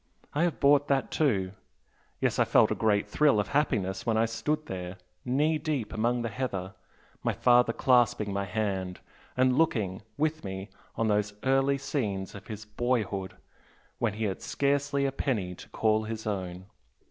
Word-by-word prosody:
I 145 - 0
have 170 -5 -2
bought 145 0 +5
that 135 -1 +1
too. 100 -12 +1 0.7
Yes - - 0
I - - +6
felt - - +4
a - - +4
great 105 -2 +1
thrill 145 -8 +3
of 105 - -1
happiness 95 -10 0
when 115 -2 +1
I 115 - +4
stood 150 +7 -2
there 90 -1 -6 0.3
knee 150 +5 +1
deep 140 -9 -2
among 120 +2 0
the 115 - -2
heather, 100 -6 -3 0.5
my - - 0
father 125 -1 +4
clasping 115 -5 +2
my 100 0 -1
hand, 95 -3 -2 0.4
and 130 +1 +3
looking, 105 - +1 0.2
with 155 +1 0
me, 95 +1 -5 0.3
on 115 - 0
those 105 -1 +1
early 135 +1 +3
scenes 105 -9 -3
of 100 - -11
his 110 -1 -7
boyhood 105 -4 -1 0.6
when 115 -3 +1
he 110 +2 -4
had 95 -3 -2
scarcely 140 0 0
a 135 - +1
penny 110 -10 -1
to - - -13
call 110 0 +1
his 110 0 -5
own! 95 -3 -4
110 Hz, 170 wpm, -29 LUFS, 100-135 Hz, 0.7 s, I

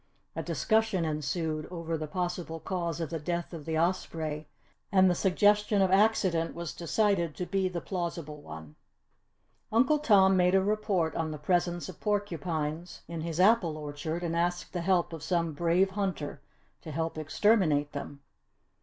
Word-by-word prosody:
A - - -2
discussion 220 -6 +1
ensued 155 +1 -2
over 165 -2 -4
the 155 -1 -4
possible 175 -1 -3
cause 170 -2 -3
of 165 -3 -3
the 165 - -2
death 170 +3 -3
of 155 -3 -7
the 160 -1 -1
osprey 160 -3 -1 0.4
and 190 -2 +6
the 180 - +4
suggestion 205 +3 +3
of 190 -1 +3
accident 190 -5 +2
was 170 -1 -5
decided 175 -2 0
to 180 - -3
be 190 0 0
the 175 -2 -4
plausible 170 -5 -4
one. 80 - -10 0.9
Uncle 255 +7 +4
Tom 195 -9 +5
made 180 0 +4
a 190 - +4
report 200 -6 0
on 165 -1 -1
the 155 - -5
presence 175 +2 0
of 185 - -10
porcupines 170 -5 -2
in 165 0 -5
his 165 0 -4
apple 185 -5 +4
orchard 155 +3 -4
and 165 -1 -1
asked 175 +1 -1
the 175 - -2
help 175 -1 +1
of 160 - -6
some 170 -1 0
brave 175 +5 +2
hunter 185 -8 -3 0.4
to 155 - -8
help 160 +2 -2
exterminate 155 -2 +2
them. 140 0 -7
170 Hz, 165 wpm, -29 LUFS, 160-190 Hz, 0.9 s, and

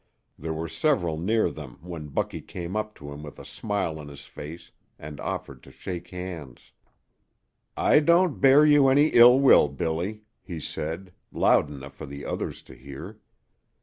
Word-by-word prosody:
There 80 +2 -5
were 80 +1 -3
several 85 - 0
near 110 +6 +1
them 70 -6 -10
when 85 -4 -7
Bucky 70 - -3
came 90 +2 -7
up 110 0 -3
to 70 -1 -10
him 70 +1 -8
with 75 -1 -10
a - - -11
smile 100 -7 -3
on 75 - -9
his 70 -1 -11
face 80 +3 -10 0.3
and 75 -1 -9
offered - - -5
to - - -15
shake 90 -2 -7
hands. 90 -7 -8 1.1
"I - - +5
don't 170 +1 +3
bear 140 +2 +7
you 145 -2 +6
any 145 +3 +5
ill 120 +2 +8
will, 135 - +6
Billy," 85 +9 -3 0.2
he 85 -4 -7
said, 85 +5 -5 0.2
loud 75 - +3
enough 70 -1 -9
for 70 - -9
the 70 +1 -8
others - - -4
to - - -14
hear. 70 +11 -10
85 Hz, 170 wpm, -26 LUFS, 75-110 Hz, 1.1 s, ill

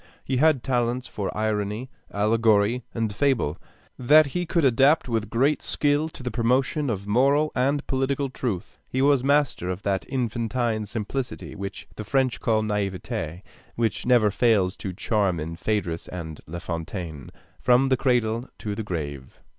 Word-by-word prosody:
He 130 - -1
had 150 -2 +3
talents 125 0 0
for 100 -3 -4
irony, 110 +3 -2 0.2
allegory, 110 +2 +2
and 110 -3 -2
fable, 115 - +1 0.4
that 150 +5 +6
he 175 +5 -3
could 170 -2 +2
adapt 135 +5 +4
with 110 -3 -1
great 135 +7 +2
skill 145 +2 +1
to 135 - -10
the 125 - -2
promotion 130 +4 +1
of 100 -3 -3
moral 140 +8 +3
and 140 +3 +1
political 135 +1 0
truth. 120 -8 -4
He 130 - -2
was 140 -2 +4
master 140 -10 +2
of 90 +2 -4
that 95 -2 -1
infantine 115 -3 -1
simplicity 120 +5 -4
which 100 0 -7
the 110 - -4
French 130 +3 +1
call 110 -2 +1
naiveté 95 -4 -3 0.3
which 115 -4 -1
never 120 -4 +5
fails 100 -4 +2
to 95 - -4
charm 100 -2 0
in 80 +2 -4
Phaedrus 90 -2 -2
and 80 -4 -7
La 85 +3 -6
Fontaine, 85 -4 -5 0.3
from 125 +2 +4
the 130 - +3
cradle 120 -1 +1
to 105 -2 -4
the 105 - -4
grave. 75 -9 -5
115 Hz, 155 wpm, -25 LUFS, 100-130 Hz, 0.4 s, that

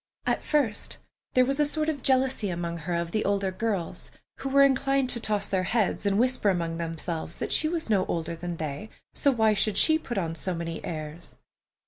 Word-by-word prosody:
At - - +1
first 265 -9 0 0.4
there 255 0 +6
was 275 +3 -1
a - - +5
sort 305 +1 -1
of 300 -4 -1
jealousy 260 -5 +2
of 175 - -3
her 170 -1 -4
among 170 0 -2
the 215 - 0
older 200 -1 0
girls, 195 -3 -3 0.3
who 270 - -4
were 275 +1 +6
inclined 275 -1 +3
to 235 - 0
toss 210 -3 0
their 190 -1 0
heads, 205 0 0
and 200 0 +2
whisper 250 -2 +3
among 170 -3 -1
themselves 165 0 -4
that - - -4
she 310 - +3
was 330 -1 -2
no 200 -4 +2
older 170 0 -2
than 175 +1 -5
they, 160 +7 -5 0.2
so 285 - +2
why 220 -5 +3
should 205 0 +1
she 315 0 +5
put 240 -7 -5
on 165 -4 -1
so 175 +2 -3
many 165 0 -5
airs? 155 +1 -7
200 Hz, 205 wpm, -27 LUFS, 170-260 Hz, 0.4 s, there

